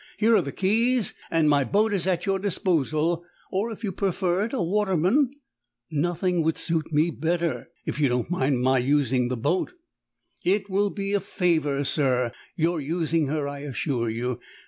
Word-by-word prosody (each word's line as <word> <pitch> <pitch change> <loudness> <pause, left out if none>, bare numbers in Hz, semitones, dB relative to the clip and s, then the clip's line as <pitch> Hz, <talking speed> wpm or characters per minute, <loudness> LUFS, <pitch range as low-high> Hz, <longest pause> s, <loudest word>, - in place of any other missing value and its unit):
Here 225 +1 +4
are - - +4
the - - -5
keys, 230 +4 +2 0.2
and 165 -2 +2
my 145 -2 +4
boat 205 - +1
is 190 -2 0
at 180 -3 0
your 195 -1 +1
disposal; 170 -4 0 0.3
or, 205 +5 -1
if 220 +1 -9
you 205 - -1
prefer 190 0 0
it, 230 - -6
a 265 - -2
waterman 195 - +2 0.3
" 120 - -42 0.2
"Nothing 175 +3 0
would 160 0 0
suit 165 -1 0
me 155 +3 +2
better, 165 +3 -1 0.2
if - - -3
you 145 -3 +3
don't 125 0 0
mind 135 -6 +1
my 130 0 +3
using 130 -2 +2
the 125 0 -2
boat." 150 - 0 0.7
"It 195 +2 +1
will 200 +2 +2
be 200 0 -3
a 205 - +3
favour, 160 -7 0
sir, 130 -4 +1 0.2
your 165 -1 0
using 160 +1 0
her, 145 0 -1
I 140 0 -5
assure 135 -4 -2
you. 120 +2 -3
165 Hz, 180 wpm, -25 LUFS, 140-195 Hz, 0.7 s, Here